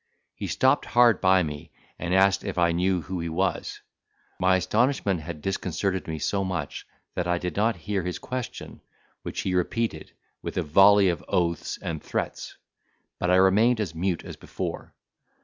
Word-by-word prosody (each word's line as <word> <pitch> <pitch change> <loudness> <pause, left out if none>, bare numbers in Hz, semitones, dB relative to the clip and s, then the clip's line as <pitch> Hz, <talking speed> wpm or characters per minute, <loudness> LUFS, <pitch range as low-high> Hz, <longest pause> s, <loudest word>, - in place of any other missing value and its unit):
He - - -5
stopped - - +2
hard 120 -3 +4
by 95 -1 +4
me, 75 +1 -6 0.3
and 85 +1 -3
asked 95 +1 +4
if - - -4
I 85 -1 +3
knew 90 +1 +1
who 90 -1 -4
he 85 0 -3
was? 90 +3 -2 0.6
My 95 0 +4
astonishment 100 +1 +1
had 75 -1 -8
disconcerted 95 0 -2
me 80 -1 -3
so 100 +5 -1
much 90 -6 -4 0.3
that 90 - -2
I 90 0 +1
did 90 +1 -4
not 110 +2 +2
hear 100 +3 -3
his 90 0 -4
question, 125 -1 -6 0.4
which - - -4
he 95 - -2
repeated 110 +6 -1 0.3
with - - -6
a 90 - +1
volley 95 +5 +6
of 85 -5 -2
oaths 85 -1 -1
and 80 -2 -4
threats; - - -4 0.6
but 90 - 0
I 90 - +5
remained 105 +6 +4
as 95 -7 -2
mute 85 +1 -2
as - - -8
before. - - -6
95 Hz, 170 wpm, -26 LUFS, 85-100 Hz, 0.6 s, volley